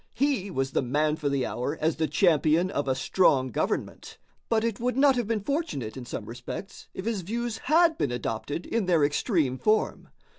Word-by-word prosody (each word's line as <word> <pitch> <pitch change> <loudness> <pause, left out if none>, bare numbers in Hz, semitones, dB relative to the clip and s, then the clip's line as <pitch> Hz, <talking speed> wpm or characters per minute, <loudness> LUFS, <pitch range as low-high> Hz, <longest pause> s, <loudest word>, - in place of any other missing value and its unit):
He 265 -8 0
was 135 -6 -2
the - - +1
man 150 +4 +1
for 150 -2 -2
the 140 -2 0
hour 140 +6 -3
as 160 0 0
the 160 0 +1
champion 170 0 +3
of 145 -4 -2
a 130 - +1
strong 135 -2 +2
government, - - -3 0.3
but 225 -1 +2
it 230 -3 -1
would 250 +1 -1
not 275 -1 +5
have 240 -4 -1
been 220 -3 -1
fortunate 245 - -2
in 130 -2 -7
some 110 - -5
respects 120 - -8
if 190 - -6
his 225 -4 -1
views 230 +4 -3
had 325 +1 +4
been 135 - 0
adopted 120 +6 -3
in 225 -5 -1
their 170 -4 +3
extreme 145 - 0
form. 215 - +1
170 Hz, 195 wpm, -27 LUFS, 135-230 Hz, 0.3 s, not